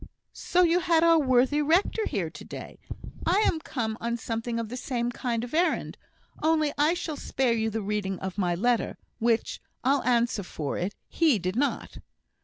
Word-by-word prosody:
so 360 Hz, 0 st, +2 dB
you 345 Hz, +1 st, +4 dB
had 335 Hz, -2 st, +3 dB
our 335 Hz, -1 st, +6 dB
worthy 265 Hz, +1 st, +3 dB
rector 355 Hz, +8 st, +2 dB
here -, -, -2 dB
to -, -, -10 dB
day; -, -, -9 dB, 0.4 s
I 370 Hz, +5 st, +3 dB
am 330 Hz, -, +2 dB
come 225 Hz, -7 st, -3 dB
on 235 Hz, 0 st, -1 dB
something 230 Hz, 0 st, -3 dB
of 230 Hz, -, -3 dB
the 250 Hz, -, -5 dB
same 245 Hz, -1 st, -2 dB
kind 235 Hz, -2 st, -2 dB
of 245 Hz, -, -7 dB
errand; 345 Hz, +3 st, +1 dB, 0.5 s
only 310 Hz, -2 st, +2 dB
I 300 Hz, +4 st, +3 dB
shall 320 Hz, -4 st, -4 dB
spare 260 Hz, -4 st, 0 dB
you 225 Hz, -1 st, 0 dB
the 220 Hz, 0 st, -3 dB
reading 200 Hz, -2 st, -2 dB
of 190 Hz, 0 st, -5 dB
my 180 Hz, -4 st, 0 dB
letter, 240 Hz, +5 st, 0 dB, 0.2 s
which, 230 Hz, 0 st, 0 dB, 0.2 s
I'll 275 Hz, +3 st, +3 dB
answer 235 Hz, -3 st, +1 dB
for 155 Hz, -6 st, -4 dB
it, 185 Hz, +4 st, -3 dB
he 315 Hz, -8 st, +3 dB
did 185 Hz, +1 st, -3 dB
not. 285 Hz, +4 st, -1 dB
245 Hz, 185 wpm, -27 LUFS, 225-310 Hz, 0.5 s, our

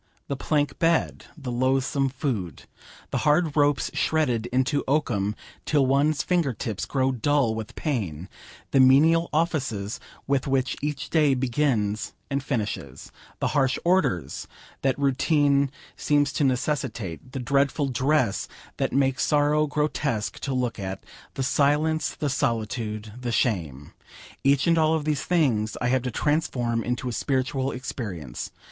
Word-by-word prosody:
The 140 Hz, -, -1 dB
plank 145 Hz, 0 st, -1 dB
bed, 165 Hz, 0 st, +1 dB
the 135 Hz, -5 st, -5 dB
loathsome 135 Hz, +2 st, +1 dB
food, 120 Hz, -, -3 dB, 0.5 s
the -, -, 0 dB
hard 150 Hz, +1 st, +2 dB
ropes 145 Hz, -1 st, +2 dB
shredded 125 Hz, -8 st, +1 dB
into 130 Hz, +4 st, +1 dB
oakum 115 Hz, -8 st, 0 dB, 0.3 s
till 145 Hz, -3 st, +2 dB
one's 140 Hz, +3 st, +2 dB
finger 170 Hz, -7 st, +1 dB
tips 110 Hz, -2 st, -4 dB
grow 135 Hz, -1 st, +1 dB
dull 130 Hz, -1 st, +1 dB
with 110 Hz, -1 st, -6 dB
pain, 95 Hz, -, -3 dB, 0.4 s
the 135 Hz, -, +4 dB
menial 155 Hz, +6 st, +5 dB
offices 135 Hz, -, -1 dB, 0.3 s
with 140 Hz, -1 st, 0 dB
which 135 Hz, -1 st, +1 dB
each 150 Hz, -1 st, -3 dB
day 150 Hz, -4 st, +4 dB
begins 120 Hz, -5 st, 0 dB, 0.2 s
and 140 Hz, 0 st, 0 dB
finishes, 105 Hz, -, -4 dB, 0.3 s
the -, -, 0 dB
harsh 135 Hz, -2 st, +2 dB
orders 95 Hz, -, +1 dB, 0.3 s
that 135 Hz, -1 st, +1 dB
routine 140 Hz, 0 st, +2 dB, 0.3 s
seems 145 Hz, -2 st, +1 dB
to 150 Hz, -, 0 dB
necessitate, 125 Hz, -, -2 dB
the 135 Hz, -, -3 dB
dreadful 140 Hz, +3 st, +1 dB
dress 130 Hz, -3 st, +1 dB, 0.3 s
that -, -, 0 dB
makes 135 Hz, -1 st, +2 dB
sorrow 150 Hz, 0 st, +3 dB
grotesque 145 Hz, -6 st, -1 dB
to 135 Hz, -, -3 dB
look 125 Hz, -4 st, -1 dB
at, 95 Hz, 0 st, -5 dB, 0.3 s
the 135 Hz, -, -1 dB
silence, 150 Hz, +3 st, +1 dB
the 150 Hz, -, -2 dB
solitude, 110 Hz, -4 st, -2 dB
the 120 Hz, -1 st, -2 dB
shame 85 Hz, -, -1 dB, 0.5 s
each 140 Hz, -1 st, +3 dB
and 165 Hz, -1 st, +3 dB
all 160 Hz, 0 st, +3 dB
of 155 Hz, -2 st, -2 dB
these 150 Hz, -2 st, 0 dB
things 125 Hz, -12 st, +1 dB
I 125 Hz, -, 0 dB
have 130 Hz, 0 st, +2 dB
to 125 Hz, -, -3 dB
transform 120 Hz, -5 st, 0 dB
into 125 Hz, +1 st, -2 dB
a -, -, -1 dB
spiritual 135 Hz, +1 st, -1 dB
experience. 95 Hz, -, -5 dB
135 Hz, 140 wpm, -25 LUFS, 115-145 Hz, 0.5 s, menial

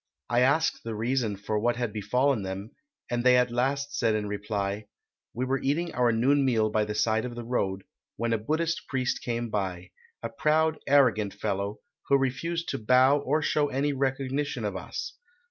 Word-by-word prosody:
I 120 Hz, -, +3 dB
asked 150 Hz, +6 st, +2 dB
the 115 Hz, -1 st, -4 dB
reason 115 Hz, -1 st, 0 dB
for 105 Hz, +2 st, -2 dB
what 120 Hz, +2 st, +1 dB
had 120 Hz, -3 st, -3 dB
befallen 125 Hz, +4 st, +1 dB
them, 95 Hz, +3 st, -5 dB, 0.4 s
and 120 Hz, 0 st, 0 dB
they 125 Hz, 0 st, +6 dB
at 125 Hz, -1 st, +2 dB
last 140 Hz, +3 st, -1 dB
said 110 Hz, -, +2 dB
in 105 Hz, -1 st, -2 dB
reply, 100 Hz, 0 st, -3 dB, 0.5 s
'We 125 Hz, +2 st, -1 dB
were 135 Hz, +1 st, 0 dB
eating 165 Hz, +5 st, -1 dB
our 125 Hz, -1 st, +3 dB
noon 135 Hz, +5 st, +3 dB
meal 110 Hz, -5 st, +2 dB
by 105 Hz, 0 st, +1 dB
the 105 Hz, 0 st, -4 dB
side 110 Hz, +1 st, +1 dB
of 120 Hz, -1 st, -5 dB
the 120 Hz, -, -6 dB
road, 95 Hz, -5 st, -1 dB, 0.3 s
when 115 Hz, +1 st, 0 dB
a 115 Hz, -, +1 dB
Buddhist 160 Hz, +9 st, -1 dB
priest 130 Hz, -2 st, -1 dB
came 120 Hz, -1 st, -3 dB
by, 95 Hz, -3 st, -3 dB, 0.3 s
a 115 Hz, -, -2 dB
proud, 155 Hz, +6 st, +1 dB
arrogant 125 Hz, -8 st, +3 dB
fellow, 100 Hz, 0 st, -3 dB, 0.3 s
who 140 Hz, -, +5 dB
refused 165 Hz, +6 st, -2 dB
to -, -, -2 dB
bow 130 Hz, +5 st, +4 dB
or 145 Hz, +3 st, 0 dB
show 150 Hz, -1 st, +2 dB
any 140 Hz, +2 st, 0 dB
recognition 135 Hz, -1 st, -1 dB
of 100 Hz, -2 st, -2 dB
us. 95 Hz, -, -5 dB
120 Hz, 185 wpm, -27 LUFS, 105-135 Hz, 0.5 s, they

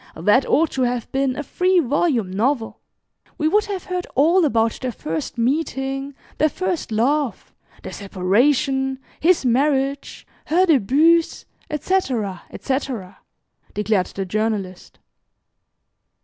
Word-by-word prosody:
That 210 Hz, +11 st, +3 dB
ought 320 Hz, +1 st, +2 dB
to 265 Hz, -, -2 dB
have 245 Hz, -2 st, -1 dB
been 270 Hz, -1 st, 0 dB
a 295 Hz, -, -4 dB
three 365 Hz, +6 st, +1 dB
volume 265 Hz, -, 0 dB
novel. 225 Hz, +4 st, -1 dB, 0.6 s
We 310 Hz, -, +1 dB
would 420 Hz, +6 st, +2 dB
have 395 Hz, -3 st, -4 dB
heard 360 Hz, -1 st, -4 dB
all 330 Hz, +6 st, +4 dB
about 225 Hz, -5 st, +1 dB
their 255 Hz, -1 st, -2 dB
first 160 Hz, -2 st, -5 dB
meeting, 270 Hz, +1 st, -2 dB, 0.2 s
their 310 Hz, -, +4 dB
first 360 Hz, -5 st, -3 dB
love, 265 Hz, +5 st, 0 dB, 0.3 s
their -, -, -7 dB
separation, 265 Hz, +8 st, +1 dB, 0.2 s
his 335 Hz, -3 st, +3 dB
marriage, 275 Hz, +2 st, 0 dB, 0.2 s
her 355 Hz, +4 st, +3 dB
débuts, 315 Hz, -, +3 dB, 0.2 s
etc., 265 Hz, -, -1 dB
etc.," 260 Hz, -8 st, -4 dB, 0.6 s
declared 210 Hz, -2 st, +1 dB
the 195 Hz, -, -5 dB
Journalist. 205 Hz, -2 st, -3 dB
265 Hz, 120 wpm, -21 LUFS, 220-305 Hz, 0.6 s, all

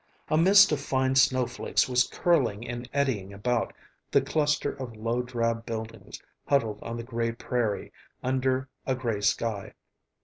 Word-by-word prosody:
A -, -, +2 dB
mist 195 Hz, +5 st, +7 dB
of 150 Hz, -2 st, 0 dB
fine 130 Hz, -1 st, +1 dB
snowflakes 130 Hz, -2 st, +2 dB
was 125 Hz, -1 st, +3 dB
curling 120 Hz, -10 st, +1 dB
and 120 Hz, +1 st, -6 dB
eddying 130 Hz, -9 st, -1 dB
about 115 Hz, +4 st, -1 dB, 0.4 s
the -, -, +4 dB
cluster 145 Hz, +1 st, 0 dB
of 125 Hz, -4 st, -7 dB
low 115 Hz, +3 st, -1 dB
drab 115 Hz, -2 st, -1 dB
buildings 110 Hz, -3 st, -7 dB, 0.3 s
huddled 115 Hz, -7 st, +1 dB
on 115 Hz, 0 st, -5 dB
the 115 Hz, -, -5 dB
gray 115 Hz, -1 st, -2 dB
prairie, 115 Hz, -3 st, -2 dB, 0.3 s
under 130 Hz, +1 st, 0 dB, 0.2 s
a 130 Hz, -, +1 dB
gray 115 Hz, -5 st, -2 dB
sky. 105 Hz, 0 st, -1 dB
125 Hz, 145 wpm, -27 LUFS, 115-130 Hz, 0.4 s, mist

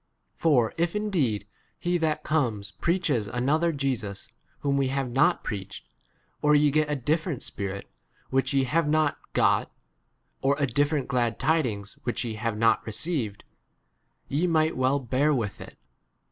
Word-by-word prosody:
For 125 Hz, -9 st, +2 dB
if 170 Hz, +2 st, +1 dB
ind 210 Hz, -1 st, -2 dB
>ed 110 Hz, -, +1 dB, 0.3 s
he 175 Hz, 0 st, 0 dB
that 155 Hz, -2 st, 0 dB
comes 115 Hz, -10 st, 0 dB
preaches 170 Hz, -, 0 dB
another 145 Hz, +9 st, +1 dB
Jesus 130 Hz, -9 st, -3 dB, 0.3 s
whom 140 Hz, -1 st, +1 dB
we 135 Hz, -1 st, +2 dB
have 135 Hz, -1 st, -2 dB
not 135 Hz, +2 st, +3 dB
preached, 100 Hz, -2 st, -6 dB, 0.5 s
or 150 Hz, 0 st, +4 dB
ye 145 Hz, 0 st, +4 dB
get 155 Hz, +1 st, +2 dB
a 150 Hz, -, +1 dB
different 155 Hz, +2 st, -1 dB
Spirit 100 Hz, 0 st, -4 dB, 0.4 s
which 135 Hz, 0 st, +1 dB
ye 135 Hz, -1 st, +3 dB
have 150 Hz, +4 st, +1 dB
not 155 Hz, -1 st, +2 dB
got, -, -, +2 dB, 0.7 s
or 140 Hz, +1 st, +3 dB
a 145 Hz, -, +2 dB
different 145 Hz, +2 st, 0 dB
glad 120 Hz, -3 st, 0 dB
tidings 120 Hz, -11 st, 0 dB
which 120 Hz, 0 st, -2 dB
ye 115 Hz, -, -3 dB
have 110 Hz, 0 st, -2 dB
not 115 Hz, +1 st, +3 dB
received, 110 Hz, -, -2 dB, 0.8 s
ye 155 Hz, +6 st, +1 dB
might 160 Hz, -1 st, +2 dB
well 130 Hz, +2 st, +2 dB
5 135 Hz, -3 st, -8 dB
bcir 140 Hz, +3 st, +3 dB
with 105 Hz, -4 st, -4 dB
[it]. -, -, -11 dB
135 Hz, 160 wpm, -27 LUFS, 115-155 Hz, 0.8 s, or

